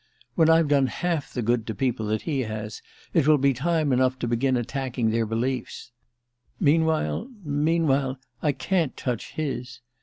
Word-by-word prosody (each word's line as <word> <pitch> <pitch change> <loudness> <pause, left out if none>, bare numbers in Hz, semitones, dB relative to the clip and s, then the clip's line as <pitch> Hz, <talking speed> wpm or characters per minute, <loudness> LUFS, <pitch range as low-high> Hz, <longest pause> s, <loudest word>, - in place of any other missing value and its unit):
When 165 -2 +4
I've 165 -1 +5
done 140 -2 +3
half 165 +2 -2
the 125 - -3
good 115 0 +1
to 110 - -3
people 120 -2 -1
that 110 +1 -1
he 150 -5 -1
has, 110 -3 -4 0.3
it 155 -4 +3
will 155 -1 +6
be 140 0 +3
time 155 +1 +1
enough 130 0 +2
to 120 - -3
begin 125 +2 +1
attacking 125 -2 -1
their 115 0 0
beliefs. 125 +2 -3 0.7
Meanwhile 160 - +2
meanwhile 145 -3 +1 0.2
I 150 - +2
can't 170 -2 -1
touch 125 -4 -3
his. 130 -5 -4
135 Hz, 160 wpm, -25 LUFS, 120-155 Hz, 0.7 s, will